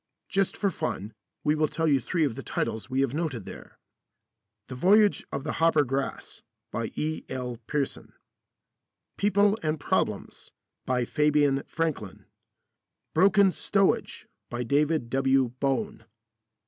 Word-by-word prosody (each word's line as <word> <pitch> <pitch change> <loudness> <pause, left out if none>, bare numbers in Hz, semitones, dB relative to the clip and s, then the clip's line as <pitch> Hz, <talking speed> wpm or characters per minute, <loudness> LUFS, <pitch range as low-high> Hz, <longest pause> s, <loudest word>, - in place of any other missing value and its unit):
Just 195 -1 0
for 200 -2 +1
fun, 110 - -4 0.3
we 150 - +3
will 155 0 +2
tell 160 +2 -1
you 140 -3 +4
three 165 +6 0
of 140 -6 +1
the - - -7
titles 110 +1 -3
we 130 +1 +1
have 135 -2 0
noted 145 - -3
there: - - -11 0.9
"The - - -7
Voyage 200 +10 +4
of 140 - -3
the 155 - -2
Hoppergrass," 145 -5 0 0.3
by - - -2
E.L. 130 -5 -3
Pearson. 145 -3 -3 1.0
"People 205 +1 +3
and 155 -1 -1
Problems," - - -2 0.4
by 125 -1 +1
Fabian 150 -1 +2
Franklin. 155 - -3 0.9
"Broken 195 +3 +5
Stowage," 195 +1 0 0.2
by 120 0 -3
David 145 +1 +1
W. 135 -1 +3
Bone. 205 +11 -1
150 Hz, 125 wpm, -27 LUFS, 130-165 Hz, 1.0 s, Broken